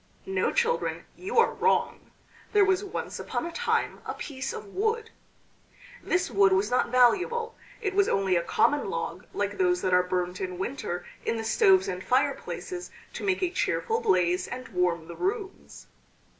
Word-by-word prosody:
No, 385 0 0
children, 480 0 0
you 385 +6 -5
are 465 - +5
wrong. 460 - 0 0.4
There 410 -1 +6
was 380 +1 +2
once 395 - -5
upon - - -3
a 340 - -4
time 480 +8 -1
a - - -5
piece 270 -3 -5
of - - -7
wood. 445 +2 -1 0.9
This 365 -7 0
wood 195 -2 +5
was 195 +4 +1
not 250 - +2
valuable; 375 - +3 0.3
it 400 -3 -1
was 400 0 +3
only 195 -2 +2
a 170 - +3
common 290 +11 +1
log - - -4
like - - -3
those 360 -1 +2
that 185 - +1
are 180 - +6
burnt 180 0 -2
in 185 -1 -4
winter 185 -4 -4 0.2
in 230 - -1
the 225 - -3
stoves 385 - +4
and - - -4
fireplaces 360 -1 -1 0.2
to - - -6
make 380 -2 0
a 355 - +1
cheerful 450 +4 0
blaze 180 - +2
and 255 +1 -7
warm 180 -4 0
the 170 - -8
rooms. 395 +1 -4
335 Hz, 170 wpm, -27 LUFS, -, 0.9 s, There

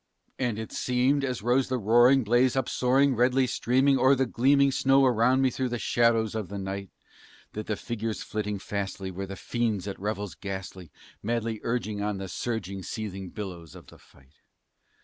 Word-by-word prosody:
And 120 -5 -1
it 110 0 -6
seemed, 130 +3 +1
as 125 -6 -3
rose 125 +3 +2
the 130 - 0
roaring 120 +4 +5
blaze, 120 +4 +3
up 130 -2 0
soaring, 135 +2 +2
redly 125 +3 +3
streaming 130 +3 +2
O'er 130 +1 +5
the 130 0 +1
gleaming 140 +3 +3
snow 135 +1 +4
around 125 +2 +3
me 130 - +3
through 130 0 -2
the 120 - -2
shadows 115 -2 +2
of 110 -4 -4
the 100 - -5
night, 95 0 -5 0.6
That 105 0 -6
the 110 - -1
figures 110 -3 -4
flitting 105 -1 -3
fastly 100 -1 -4
were 95 +2 -5
the 95 - -6
fiends 110 -2 -2
at 100 - -5
revels 105 -1 -3
ghastly, 95 -4 -7 0.3
Madly 115 0 -2
urging 110 -3 -2
on 105 -1 -1
the 95 -1 -6
surging, 100 -2 -4
seething 95 -2 -6
billows 85 -7 -8
of - - -13
the - - -16
fight. 70 0 -23
115 Hz, 180 wpm, -27 LUFS, 100-125 Hz, 0.6 s, roaring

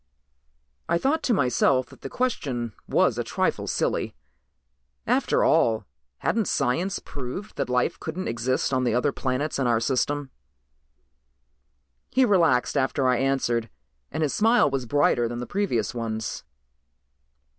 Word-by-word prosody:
I - - +3
thought 280 - +1
to - - 0
myself 130 - +2
that - - -16
the 135 - -6
question 130 - -2 0.2
was - - +2
a - - 0
trifle - - -1
silly; - - -1 0.9
after - - +2
all, 110 -3 +3 0.3
hadn't 220 - 0
science 165 +9 0
proved 145 +11 -7
that - - -2
life 125 0 0
couldn't 170 +4 -4
exist 125 +3 -1
on 130 0 +2
the 120 -2 +1
other 130 +4 +2
planets 135 +3 -2
in 135 - +1
our 115 -2 +3
system? 135 +3 -1 1.8
He 260 0 +3
relaxed 165 - +3
after 135 -1 +1
I 125 -1 +3
answered 120 -3 0 0.4
and 160 - -1
his 145 - 0
smile 225 - +4
was 130 -3 -2
brighter 140 -3 +2
than 120 +1 -5
the 125 - -4
previous 120 - -1
ones. 110 - -4
130 Hz, 140 wpm, -25 LUFS, 120-160 Hz, 1.8 s, smile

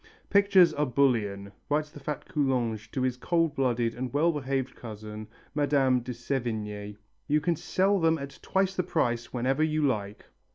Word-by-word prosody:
"Pictures 195 -4 +6
are 150 -1 0
bullion," 110 -7 +1 0.2
writes 150 +1 0
the 145 - -11
fat 150 +1 -5
Coulanges 120 -7 0
to 130 +3 -3
his 130 -1 0
cold 165 +2 +1
blooded 120 -3 +1
and 125 +1 -4
well 155 +4 +3
behaved 135 -3 -2
cousin, 110 -1 -8 0.3
Mme. 140 -3 +3
de 125 - -6
Sévigné, 110 -5 -4 0.3
"you 150 +1 +3
can 170 +3 0
sell 195 +5 +1
them 165 -1 +3
at 140 -1 -8
twice 190 0 0
their 180 - 0
price 120 -9 -1
whenever 130 +4 0
you 155 -1 +1
like." 105 -6 -2
135 Hz, 165 wpm, -28 LUFS, 115-155 Hz, 0.3 s, Pictures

